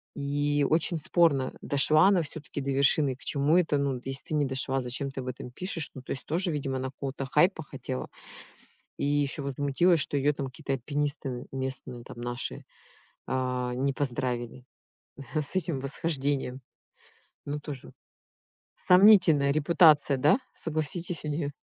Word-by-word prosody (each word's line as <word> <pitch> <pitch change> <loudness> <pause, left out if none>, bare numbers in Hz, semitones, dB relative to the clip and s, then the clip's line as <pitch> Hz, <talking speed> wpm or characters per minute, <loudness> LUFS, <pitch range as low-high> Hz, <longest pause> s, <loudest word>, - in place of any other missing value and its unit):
И 145 0 0
очень 165 +2 +2
спорно: 150 -4 +2
дошла 155 +4 +4
она 195 -3 +4
всё-таки 150 -1 -6
до 140 0 -2
вершины? 140 0 +3
К - - -46
чему 145 +4 +2
это? 160 -5 +2
Ну, 140 -2 -1
если 135 0 -4
ты - - -4
не 145 -1 +2
дошла, 135 0 -1
зачем 130 +2 -2
ты 135 - -7
об 130 - -6
этом 125 0 -6
пишешь? 165 +1 -2
Ну 130 - -9
то - - -9
есть 135 - -3
тоже, 175 +3 0
видимо, 135 -3 -2
она 130 - -3
какого-то 135 +1 -5
хайпа 160 +5 +2
хотела. 65 - -6 0.9
И - - -4
ещё 145 0 0
возмутилась, 145 +5 +2
что 145 - +1
её 140 +1 +2
там 140 -1 -4
какие-то 140 +2 -7
альпинисты 135 -1 -3
местные, 130 -2 -5
там, 120 - -10
наши, 120 +1 -4 0.6
а, 125 -1 -2
не 135 +2 0
поздравили 125 -2 -3 0.7
с 155 +2 0
этим 170 -6 -1
восхождением. 140 -2 -1 0.9
Ну 145 +1 -4
тоже. 145 -3 -6 0.8
Сомнительная 180 -7 +6
репутация, 150 -2 +4
да? 150 - +4
Согласитесь 165 +2 -2
у 150 - -3
неё? 145 -1 -2
140 Hz, 150 wpm, -28 LUFS, 130-155 Hz, 0.9 s, Сомнительная